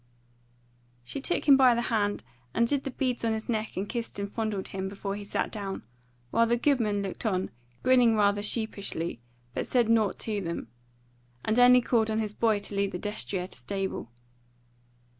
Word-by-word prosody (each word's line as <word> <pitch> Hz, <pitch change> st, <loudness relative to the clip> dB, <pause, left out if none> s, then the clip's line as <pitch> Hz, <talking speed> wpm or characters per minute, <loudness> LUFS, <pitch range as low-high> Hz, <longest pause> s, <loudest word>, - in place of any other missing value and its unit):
She 195 Hz, -, -6 dB
took 350 Hz, -, 0 dB
him 280 Hz, -, +9 dB
by 255 Hz, -3 st, +6 dB
the 235 Hz, -, 0 dB
hand 205 Hz, -, +1 dB, 0.3 s
and 235 Hz, -, +3 dB
did 280 Hz, +1 st, 0 dB
the -, -, -1 dB
beads 255 Hz, -2 st, -2 dB
on 225 Hz, -1 st, +2 dB
his 220 Hz, 0 st, -4 dB
neck 220 Hz, -2 st, -2 dB
and 195 Hz, +2 st, -2 dB
kissed 235 Hz, -2 st, -4 dB
and 200 Hz, 0 st, -2 dB
fondled 215 Hz, -4 st, -2 dB
him 190 Hz, 0 st, -3 dB
before 200 Hz, 0 st, -4 dB
he 205 Hz, -, -6 dB
sat 200 Hz, -, -2 dB
down, 200 Hz, -2 st, -5 dB, 0.5 s
while 230 Hz, 0 st, +4 dB
the 240 Hz, +1 st, +2 dB
goodman 230 Hz, -6 st, +1 dB
looked 195 Hz, -, -5 dB
on, 190 Hz, -5 st, 0 dB, 0.3 s
grinning 245 Hz, -3 st, +5 dB
rather 205 Hz, -1 st, +3 dB
sheepishly, 200 Hz, -, -2 dB, 0.3 s
but -, -, -3 dB
said 240 Hz, -3 st, +2 dB
nought 220 Hz, -3 st, +3 dB
to 210 Hz, -2 st, -2 dB
them; 170 Hz, -9 st, -4 dB, 0.8 s
and 220 Hz, +3 st, +2 dB
only 250 Hz, 0 st, +8 dB
called 225 Hz, -2 st, +2 dB
on 220 Hz, -, 0 dB
his 215 Hz, -2 st, -2 dB
boy 220 Hz, -1 st, +2 dB
to 205 Hz, -, -6 dB
lead 200 Hz, 0 st, 0 dB
the -, -, -2 dB
destrier 200 Hz, -2 st, -3 dB
to 185 Hz, -, -10 dB
stable. 190 Hz, -, -4 dB
215 Hz, 185 wpm, -28 LUFS, 200-235 Hz, 0.8 s, him